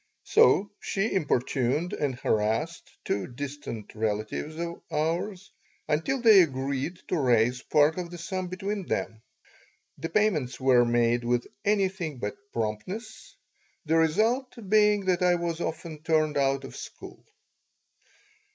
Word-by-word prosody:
So 320 Hz, -, +4 dB
she 200 Hz, +1 st, -1 dB
importuned 145 Hz, 0 st, 0 dB
and 140 Hz, -3 st, -1 dB
harassed 115 Hz, +8 st, -1 dB, 0.2 s
two 100 Hz, -2 st, -1 dB
distant 135 Hz, -4 st, -7 dB
relatives 110 Hz, +7 st, -2 dB
of 170 Hz, 0 st, -5 dB
ours 180 Hz, +5 st, -2 dB, 0.4 s
until 165 Hz, -, 0 dB
they 220 Hz, -5 st, +8 dB
agreed 140 Hz, +2 st, -2 dB
to 180 Hz, -, +1 dB
raise 125 Hz, -1 st, +2 dB
part 155 Hz, +3 st, +3 dB
of 175 Hz, -1 st, -4 dB
the 175 Hz, -, -8 dB
sum 185 Hz, +2 st, -4 dB
between 195 Hz, +1 st, -4 dB
them. 110 Hz, -1 st, -2 dB, 0.8 s
The 165 Hz, -, -4 dB
payments 165 Hz, -, +1 dB
were 130 Hz, -2 st, +5 dB
made 120 Hz, 0 st, +2 dB
with 120 Hz, 0 st, 0 dB, 0.2 s
anything 190 Hz, -7 st, 0 dB
but 105 Hz, -3 st, -4 dB, 0.2 s
promptness, 185 Hz, -, -5 dB, 0.5 s
the 160 Hz, +1 st, +2 dB
result 225 Hz, -, +2 dB
being 210 Hz, -1 st, +4 dB
that 185 Hz, -1 st, +1 dB
I 180 Hz, -1 st, +4 dB
was 170 Hz, -1 st, -3 dB
often 160 Hz, -2 st, -5 dB
turned 155 Hz, -2 st, +1 dB
out 135 Hz, -1 st, +1 dB
of 135 Hz, -, -9 dB
school. -, -, -10 dB
160 Hz, 130 wpm, -27 LUFS, 130-185 Hz, 0.8 s, they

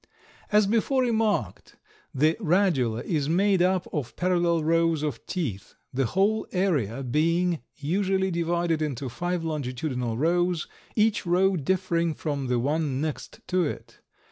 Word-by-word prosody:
As 210 Hz, 0 st, +5 dB
before 235 Hz, +5 st, +2 dB
remarked, 225 Hz, -3 st, -1 dB, 0.4 s
the 155 Hz, +3 st, +2 dB
radula 155 Hz, -, +1 dB
is 150 Hz, -4 st, -1 dB
made 190 Hz, +2 st, +3 dB
up 185 Hz, 0 st, +2 dB
of 145 Hz, -6 st, -3 dB
parallel 175 Hz, -2 st, +1 dB
rows 165 Hz, -1 st, +2 dB
of 150 Hz, -, -3 dB
teeth, 120 Hz, -, -4 dB, 0.2 s
the 130 Hz, -1 st, +1 dB
whole 205 Hz, -, +1 dB
area 140 Hz, -, 0 dB
being 165 Hz, +5 st, +1 dB
usually 190 Hz, +5 st, 0 dB
divided 170 Hz, -1 st, 0 dB
into 140 Hz, -3 st, -3 dB
five 175 Hz, +6 st, -2 dB
longitudinal 130 Hz, -5 st, -3 dB
rows, 175 Hz, +3 st, +1 dB, 0.3 s
each 215 Hz, -3 st, +2 dB
row 190 Hz, +2 st, +3 dB
differing 170 Hz, 0 st, 0 dB
from 145 Hz, -4 st, -3 dB
the 125 Hz, 0 st, +1 dB
one 140 Hz, +1 st, 0 dB
next 155 Hz, 0 st, -5 dB
to 185 Hz, -1 st, +2 dB
it. 150 Hz, -, -6 dB
165 Hz, 135 wpm, -26 LUFS, 145-185 Hz, 0.4 s, As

